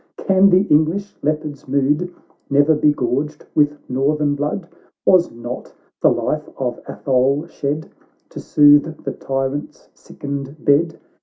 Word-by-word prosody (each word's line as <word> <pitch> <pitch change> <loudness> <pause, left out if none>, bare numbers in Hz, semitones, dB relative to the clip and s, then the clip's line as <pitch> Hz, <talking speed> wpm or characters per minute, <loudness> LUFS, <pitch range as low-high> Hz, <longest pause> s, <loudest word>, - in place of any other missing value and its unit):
can 190 +1 +4
the 185 +1 +5
English 160 +7 +2
Leopard's 150 -1 -3
mood 145 +6 +1 0.4
Never 145 +3 +4
be 150 0 +3
gorged 145 +3 -2
with 150 0 +2
northern 145 +3 +1
blood? 150 +5 -3 0.4
Was 180 -2 +5
not 120 +1 -7 0.3
the - - +5
life - - -2
of - - -3
Atholex 135 +5 0
shed, 150 +2 -3 0.4
To - - -9
soothe 145 +2 +4
the - - -3
tyrant's 135 +1 -4
sickened 140 +1 -7
bed? 155 +3 +3
145 Hz, 130 wpm, -19 LUFS, 140-155 Hz, 0.4 s, the